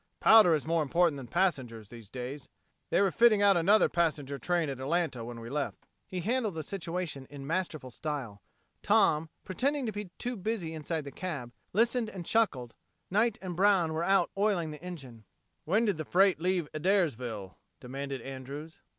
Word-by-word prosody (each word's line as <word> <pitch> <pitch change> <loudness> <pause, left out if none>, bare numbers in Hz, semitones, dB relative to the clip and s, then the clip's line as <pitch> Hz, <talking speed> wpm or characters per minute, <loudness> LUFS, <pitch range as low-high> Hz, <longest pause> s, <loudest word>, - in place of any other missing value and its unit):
Powder 215 -7 +7
is 150 - -3
more 165 0 +1
important 165 +1 +2
than 130 -3 -8
passengers 130 - -1
these 115 -4 -12
days. 130 +3 -7 0.4
They - - +3
were 195 -2 +3
fitting 220 -2 +5
out 200 -1 +6
another 200 +6 +5
passenger 150 -5 -1
train 175 +3 0
at 135 -2 -4
Atlanta 150 -3 -1
when 120 0 -7
we 115 - -8
left." 140 +3 -3 0.2
He 180 -1 -4
handled 220 -1 0
the 160 - -3
situation 170 -6 -4
in 140 -1 -9
masterful 155 -5 -2
style. 130 -7 -5 0.4
Tom, 195 -7 +3 0.2
pretending 270 +8 0
to 220 - -1
be 210 0 -5 0.3
busy 190 -4 -3
inside 160 0 -3
the 140 - -8
cab, 145 -10 -5 0.2
listened 230 +2 +2
and 185 -5 -7
chuckled. 140 - +1 0.4
Knight 215 +3 +2
and 180 -2 -4
Brown 185 -4 +3
were 160 - -1
out 195 +2 +3
oiling 195 -6 +1
the 150 -1 -9
engine. 135 -11 -9 0.4
"When 210 +8 +2
did 205 -6 +1
the 155 - -3
freight 185 +1 +3
leave 180 -3 +1
Adairsville?" 130 - 0 0.2
demanded 135 +1 -5
Andrews. 135 +4 -8
165 Hz, 170 wpm, -30 LUFS, 135-195 Hz, 0.4 s, Powder